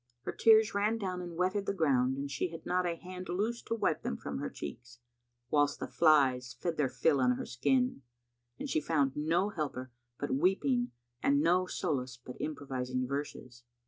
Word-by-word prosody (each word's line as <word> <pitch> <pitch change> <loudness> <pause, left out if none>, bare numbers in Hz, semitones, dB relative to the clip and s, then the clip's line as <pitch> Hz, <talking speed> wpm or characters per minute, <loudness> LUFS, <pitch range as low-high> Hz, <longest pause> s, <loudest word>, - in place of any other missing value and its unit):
Her - - -3
tears 220 -1 +5
ran 210 +3 +1
down 185 -4 -3
and 175 -1 -7
wetted 185 +2 0
the 200 - 0
ground 130 -6 +2
and 140 0 -4
she 140 - -1
had 165 0 -9
not 180 0 +1
a 170 - -1
hand 185 +2 -8
loose 215 +6 -1
to 230 - -2
wipe 165 -8 0
them 70 - -3
from - - -5
her - - -3
cheeks, 120 - -8 0.5
whilst 145 -1 +2
the - - -4
flies 130 -6 +3
fed 170 +2 -1
their 140 -3 +2
fill 135 +3 +2
on 125 0 +4
her - - -4
skin, 250 - +1 0.6
and - - -5
she 155 - +1
found 145 -4 +1
no 165 +6 +1
helper 140 - -4 0.3
but 145 - -3
weeping 200 - +2 0.3
and 140 0 +3
no 180 +2 +3
solace 130 -8 -2
but 125 +1 -10
improvising 130 -4 -3
verses. 130 -3 -5
150 Hz, 185 wpm, -32 LUFS, 130-185 Hz, 0.6 s, tears